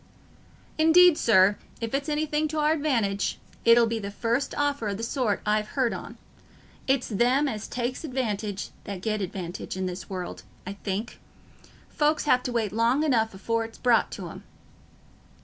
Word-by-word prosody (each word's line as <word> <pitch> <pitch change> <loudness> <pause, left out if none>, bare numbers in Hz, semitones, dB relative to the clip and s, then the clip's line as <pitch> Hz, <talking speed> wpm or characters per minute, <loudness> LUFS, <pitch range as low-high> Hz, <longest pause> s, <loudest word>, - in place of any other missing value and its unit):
"Indeed, 335 +2 +7
sir, 205 -6 +4 0.2
if 230 +1 -4
it's 280 +2 -1
anything 300 0 0
t' 310 +1 -5
our 300 0 +3
advantage, 230 -11 0 0.3
it'll 235 0 +6
be 225 0 -2
the 200 -1 -5
first 235 +6 -1
offer 285 -5 0
o' 200 - -2
the 225 - -6
sort 230 -4 0
I've 215 0 0
heared 255 -4 +2
on. - - -8 0.7
It's 265 -1 +2
them 250 +7 +2
as 215 -5 -4
take 245 +3 -3
advantage 215 -8 -3 0.2
that 195 -3 -6
get 215 -1 -1
advantage 180 -1 -5
i' - - -3
this 185 0 -4
world, 185 -2 -5 0.2
I 195 - -5
think: 200 +3 -4 0.7
folks 300 +1 +1
have 250 -4 +4
to 250 - -4
wait 225 -4 0
long 235 +6 +2
enough 225 -8 +1
afore 230 +4 -1
it's 225 0 -9
brought 240 -3 +3
to - - -6
'em." - - -10
230 Hz, 165 wpm, -26 LUFS, 205-275 Hz, 0.7 s, Indeed